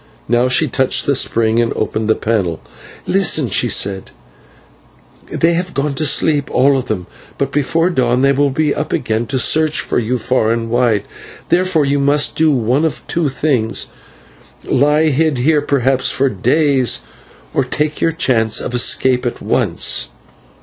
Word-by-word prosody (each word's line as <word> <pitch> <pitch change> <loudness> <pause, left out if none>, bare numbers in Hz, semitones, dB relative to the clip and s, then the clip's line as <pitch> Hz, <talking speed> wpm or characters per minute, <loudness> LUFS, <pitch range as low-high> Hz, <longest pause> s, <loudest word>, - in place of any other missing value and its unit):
Now 120 +2 +2
she 155 +5 +2
touched 130 0 +1
the 140 - +1
spring 115 -3 +1
and 120 -1 0
opened 110 0 -3
the 110 - +3
panel. 100 -8 -2 0.5
"Listen," 160 - +1
she 120 +4 +1
said, 95 -1 0 1.2
"they 165 +1 +1
have 180 +1 -3
gone 140 +1 -1
to 150 +2 0
sleep 145 -1 +1
all 140 +2 +3
of 130 -1 -3
them, 90 -5 -3 0.3
but 135 -1 -2
before 165 +5 0
dawn 130 -4 +1
they 140 - +4
will 140 +1 +1
be 150 +2 0
up 150 - -4
again 115 -1 -2
to 130 - -2
search 155 +4 +2
for - - -1
you 120 +2 -1
far 120 -1 0
and 115 0 -2
wide. 120 -4 +1 0.5
Therefore 180 -4 +1
you 140 +1 0
must 145 +1 +1
do 160 0 +2
one 130 +1 +1
of 160 - -3
two 165 -3 -1
things; 130 -5 -1 0.8
lie 150 +3 +2
hid 155 0 0
here, 150 +4 +2
perhaps 135 -2 0
for 135 0 +1
days, 130 - +1 0.5
or 140 - +1
take 150 +4 -3
your 165 - +2
chance 120 -9 0
of - - -5
escape 125 +1 +2
at 120 - -4
once." - - 0
135 Hz, 165 wpm, -16 LUFS, 120-150 Hz, 1.2 s, they